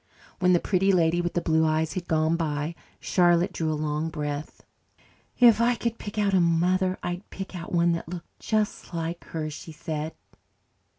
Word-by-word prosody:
When 180 Hz, 0 st, +4 dB
the 175 Hz, -, +5 dB
Pretty 195 Hz, +1 st, +2 dB
Lady 175 Hz, -1 st, +3 dB
with 175 Hz, 0 st, -2 dB
the 175 Hz, -, +2 dB
Blue 160 Hz, 0 st, +3 dB
Eyes 155 Hz, 0 st, +1 dB
had 180 Hz, -2 st, -4 dB
gone 160 Hz, +1 st, +2 dB
by, 155 Hz, -1 st, -2 dB, 0.3 s
Charlotte 175 Hz, -1 st, +3 dB
drew 160 Hz, -1 st, -1 dB
a -, -, 0 dB
long 150 Hz, +1 st, -1 dB
breath. 150 Hz, -1 st, -5 dB, 0.7 s
"If 235 Hz, -3 st, +6 dB
I 240 Hz, +1 st, +3 dB
could 230 Hz, 0 st, -3 dB
pick 205 Hz, +1 st, -7 dB
out 205 Hz, -2 st, +2 dB
a 190 Hz, -, +5 dB
mother 180 Hz, +3 st, +2 dB
I'd 175 Hz, +3 st, -4 dB
pick 190 Hz, 0 st, -7 dB
out 170 Hz, -1 st, -7 dB
one 170 Hz, 0 st, +3 dB
that 165 Hz, -1 st, -3 dB
looked 175 Hz, -1 st, -9 dB
just 215 Hz, -4 st, -1 dB
like 165 Hz, +1 st, -4 dB
her," 155 Hz, -2 st, -4 dB
she 160 Hz, -, -9 dB
said. 155 Hz, 0 st, -5 dB
170 Hz, 185 wpm, -26 LUFS, 160-185 Hz, 0.7 s, If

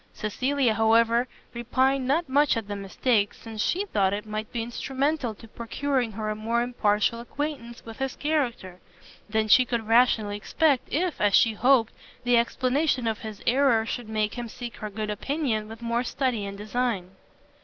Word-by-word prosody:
Cecilia, 255 Hz, +3 st, 0 dB
however, 230 Hz, +2 st, +3 dB, 0.3 s
repined 255 Hz, +2 st, +1 dB
not 315 Hz, +5 st, +1 dB
much 285 Hz, -1 st, +3 dB
at 225 Hz, -3 st, -4 dB
the 205 Hz, -, -4 dB
mistake, 205 Hz, +2 st, 0 dB
since 220 Hz, -2 st, -7 dB
she 385 Hz, +4 st, 0 dB
thought 200 Hz, -, +1 dB
it 205 Hz, +1 st, -3 dB
might 215 Hz, 0 st, -5 dB
be 235 Hz, -2 st, -2 dB
instrumental 265 Hz, +1 st, -2 dB
to 225 Hz, -, -14 dB
procuring 240 Hz, +1 st, -2 dB
her 215 Hz, 0 st, -3 dB
a -, -, -3 dB
more 230 Hz, +2 st, 0 dB
impartial 230 Hz, -2 st, +1 dB
acquaintance 245 Hz, -1 st, -5 dB
with 225 Hz, +1 st, -10 dB
his 270 Hz, -1 st, -2 dB
character, 245 Hz, -, -2 dB, 0.5 s
than 220 Hz, 0 st, +1 dB
she 255 Hz, +4 st, +7 dB
could 235 Hz, -3 st, -3 dB
rationally 225 Hz, -3 st, +3 dB
expect, 280 Hz, +5 st, +1 dB
if, 340 Hz, +2 st, -1 dB
as 205 Hz, -1 st, +4 dB
she 225 Hz, -, +5 dB
hoped, 245 Hz, 0 st, +3 dB, 0.3 s
the 245 Hz, 0 st, +3 dB
explanation 255 Hz, +3 st, +1 dB
of 220 Hz, -1 st, -1 dB
his 215 Hz, -2 st, -8 dB
error 245 Hz, -3 st, +3 dB
should 235 Hz, -1 st, -5 dB
make 215 Hz, -1 st, -1 dB
him 240 Hz, -1 st, -5 dB
seek 240 Hz, +1 st, -8 dB
her 215 Hz, -, -5 dB
good 210 Hz, +1 st, -4 dB
opinion 230 Hz, -2 st, -2 dB
with 225 Hz, +1 st, -10 dB
more 235 Hz, +1 st, 0 dB
study 250 Hz, -5 st, -1 dB
and 200 Hz, 0 st, -7 dB
design. 210 Hz, -3 st, -2 dB
235 Hz, 175 wpm, -26 LUFS, 215-260 Hz, 0.5 s, she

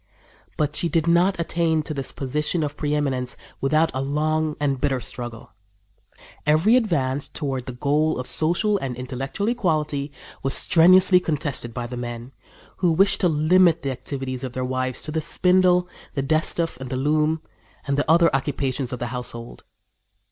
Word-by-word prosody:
But 150 Hz, -1 st, -1 dB
she 170 Hz, -, 0 dB
did 165 Hz, -2 st, +1 dB
not 175 Hz, +2 st, +3 dB
attain 165 Hz, -2 st, 0 dB
to 155 Hz, -, -4 dB
this 135 Hz, -2 st, -4 dB
position 150 Hz, +5 st, -2 dB
of 145 Hz, -1 st, -4 dB
preëminence 140 Hz, -4 st, -1 dB, 0.3 s
without 155 Hz, +4 st, +2 dB
a 130 Hz, -, -2 dB
long 155 Hz, +2 st, -1 dB
and 140 Hz, -3 st, -1 dB
bitter 135 Hz, -3 st, +1 dB
struggle. 120 Hz, 0 st, -7 dB, 0.9 s
Every 160 Hz, +10 st, +4 dB
advance 145 Hz, -, +1 dB
toward 135 Hz, -5 st, -4 dB
the 130 Hz, -, -5 dB
goal 150 Hz, +5 st, +1 dB
of 125 Hz, -, -4 dB
social 175 Hz, +9 st, +1 dB
and 130 Hz, -5 st, -4 dB
intellectual 135 Hz, -, -4 dB
equality 155 Hz, -, -1 dB, 0.3 s
was 135 Hz, -, +1 dB
strenuously 180 Hz, +2 st, +6 dB
contested 150 Hz, -7 st, -3 dB
by 120 Hz, +1 st, -5 dB
the 125 Hz, +1 st, -6 dB
men, 120 Hz, +1 st, -6 dB, 0.5 s
who 175 Hz, -3 st, +2 dB
wished 195 Hz, +4 st, +3 dB
to 180 Hz, -, +3 dB
limit 165 Hz, +2 st, +3 dB
the 135 Hz, -, -1 dB
activities 130 Hz, 0 st, -5 dB
of 130 Hz, -2 st, -5 dB
their 130 Hz, 0 st, -2 dB
wives 130 Hz, 0 st, -2 dB
to 155 Hz, -, -5 dB
the 160 Hz, +1 st, -1 dB
spindle, 180 Hz, +2 st, +3 dB, 0.3 s
the 135 Hz, -, -1 dB
distaff 155 Hz, +1 st, 0 dB
and 130 Hz, -1 st, -8 dB
the 130 Hz, -, -3 dB
loom 155 Hz, +3 st, +1 dB, 0.4 s
and 140 Hz, -, 0 dB
the 145 Hz, +1 st, -1 dB
other 165 Hz, -2 st, +4 dB
occupations 135 Hz, -2 st, -2 dB
of 125 Hz, -, -3 dB
the 120 Hz, -, -4 dB
household. 120 Hz, -1 st, -7 dB
150 Hz, 165 wpm, -23 LUFS, 130-165 Hz, 0.9 s, strenuously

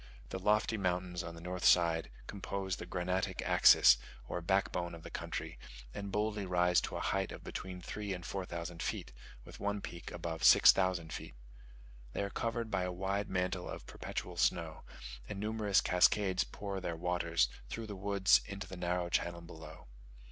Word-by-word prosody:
The 95 Hz, -, -4 dB
lofty 105 Hz, +3 st, +2 dB
mountains 90 Hz, -2 st, -1 dB
on 85 Hz, -1 st, -7 dB
the 85 Hz, -, -10 dB
north 90 Hz, +1 st, -5 dB
side 85 Hz, -4 st, +4 dB, 0.2 s
compose 95 Hz, -1 st, -4 dB
the 85 Hz, -, -8 dB
granitic 90 Hz, +1 st, -1 dB
axis, -, -, +7 dB, 0.3 s
or 90 Hz, -, -3 dB
backbone 85 Hz, -1 st, 0 dB
of 80 Hz, -, -12 dB
the -, -, -9 dB
country -, -, -5 dB, 0.3 s
and 100 Hz, -1 st, -5 dB
boldly 105 Hz, 0 st, -1 dB
rise 90 Hz, -1 st, +3 dB
to -, -, -5 dB
a -, -, -2 dB
height 95 Hz, +2 st, 0 dB
of -, -, -9 dB
between 90 Hz, -1 st, -6 dB
three 105 Hz, +2 st, -5 dB
and 90 Hz, -2 st, -4 dB
four 95 Hz, +1 st, -3 dB
thousand 85 Hz, -1 st, -6 dB
feet, -, -, -3 dB, 0.3 s
with -, -, -12 dB
one 100 Hz, 0 st, -1 dB
peak 85 Hz, -3 st, -7 dB
above 80 Hz, -1 st, -5 dB
six -, -, +9 dB
thousand 90 Hz, -4 st, 0 dB
feet. -, -, -7 dB, 0.8 s
They -, -, -1 dB
are 100 Hz, -, -4 dB
covered 115 Hz, -1 st, -2 dB
by 100 Hz, -, +1 dB
a 90 Hz, 0 st, -1 dB
wide 95 Hz, +2 st, -2 dB
mantle 90 Hz, -1 st, -1 dB
of -, -, -7 dB
perpetual -, -, -6 dB
snow, -, -, +1 dB, 0.5 s
and 100 Hz, -, -5 dB
numerous 105 Hz, -1 st, +2 dB
cascades 95 Hz, +1 st, +3 dB
pour 100 Hz, -2 st, -5 dB
their 85 Hz, -2 st, -3 dB
waters, 85 Hz, -4 st, +1 dB, 0.2 s
through 115 Hz, -, -5 dB
the 105 Hz, -2 st, -6 dB
woods, 100 Hz, 0 st, +4 dB
into 100 Hz, -2 st, -6 dB
the 95 Hz, 0 st, -9 dB
narrow 90 Hz, 0 st, -1 dB
channel 85 Hz, 0 st, -1 dB
below. 80 Hz, -2 st, -11 dB
90 Hz, 175 wpm, -34 LUFS, 85-100 Hz, 0.8 s, six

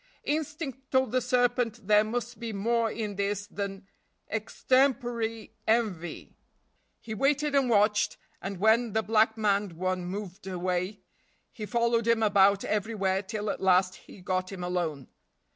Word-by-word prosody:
Instinct 295 Hz, -3 st, -3 dB
told 260 Hz, -3 st, +2 dB
the 255 Hz, +1 st, +2 dB
serpent 245 Hz, -2 st, +1 dB
there 210 Hz, +1 st, +5 dB
must 240 Hz, +2 st, -4 dB
be 235 Hz, -1 st, -4 dB
more 230 Hz, +3 st, +1 dB
in 210 Hz, -3 st, -4 dB
this 200 Hz, 0 st, -1 dB
than 200 Hz, -1 st, -5 dB, 0.5 s
extempore 235 Hz, 0 st, 0 dB, 0.2 s
envy. 205 Hz, -8 st, -1 dB, 0.6 s
He 220 Hz, -, -7 dB
waited 285 Hz, +5 st, +1 dB
and 275 Hz, -3 st, +3 dB
watched, 210 Hz, -1 st, +3 dB, 0.2 s
and, 195 Hz, 0 st, -5 dB
when 220 Hz, +2 st, +3 dB
the 220 Hz, 0 st, +1 dB
black 220 Hz, +1 st, +3 dB
maned 205 Hz, -3 st, +1 dB
one 185 Hz, +1 st, -2 dB
moved 195 Hz, 0 st, -6 dB
away, 185 Hz, +2 st, -2 dB, 0.5 s
he 215 Hz, -4 st, -6 dB
followed 235 Hz, -1 st, +1 dB
him 230 Hz, -1 st, +3 dB
about 200 Hz, -1 st, +4 dB
everywhere 200 Hz, -3 st, 0 dB
till 210 Hz, +1 st, -3 dB
at -, -, -6 dB
last 185 Hz, 0 st, +4 dB
he 190 Hz, -, -14 dB
got 185 Hz, +1 st, -2 dB
him 185 Hz, -2 st, -6 dB
alone. 170 Hz, -6 st, -2 dB
215 Hz, 145 wpm, -28 LUFS, 195-235 Hz, 0.6 s, there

